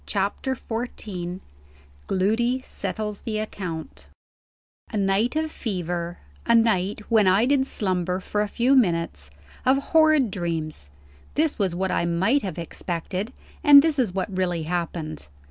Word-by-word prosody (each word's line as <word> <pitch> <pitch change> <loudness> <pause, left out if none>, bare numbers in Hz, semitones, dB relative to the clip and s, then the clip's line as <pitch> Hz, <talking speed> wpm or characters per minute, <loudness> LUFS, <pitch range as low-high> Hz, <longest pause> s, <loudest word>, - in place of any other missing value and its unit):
CHAPTER 205 +6 -1
XIV 205 -7 -5 0.7
GLOODY 235 +7 +1
SETTLES 210 -5 -4
THE 215 -2 -3
ACCOUNT 185 -7 -6 0.8
A 220 - -2
night 200 +6 +1
of 315 0 0
fever; 175 - -3 0.3
a 235 - +3
night, 210 -3 +2
when 220 -4 +4
I 195 +5 +4
did 270 0 +2
slumber 185 -4 -1
for 210 +2 -2
a 210 - 0
few 250 +6 +2
minutes, 170 - +1 0.3
of 260 +1 +4 0.2
horrid 310 -7 +5
dreams 160 - -4 0.5
this 310 -3 +1
was 190 -4 +1
what 190 +1 -1
I - - +1
might 190 +12 +2
have 190 -7 -5
expected, 175 +5 -4 0.3
and 285 -1 +9
this 315 -3 +1
is 235 -7 +2
what 190 +1 -3
really 175 -3 0
happened. 165 -2 -4
195 Hz, 140 wpm, -24 LUFS, 175-235 Hz, 0.8 s, and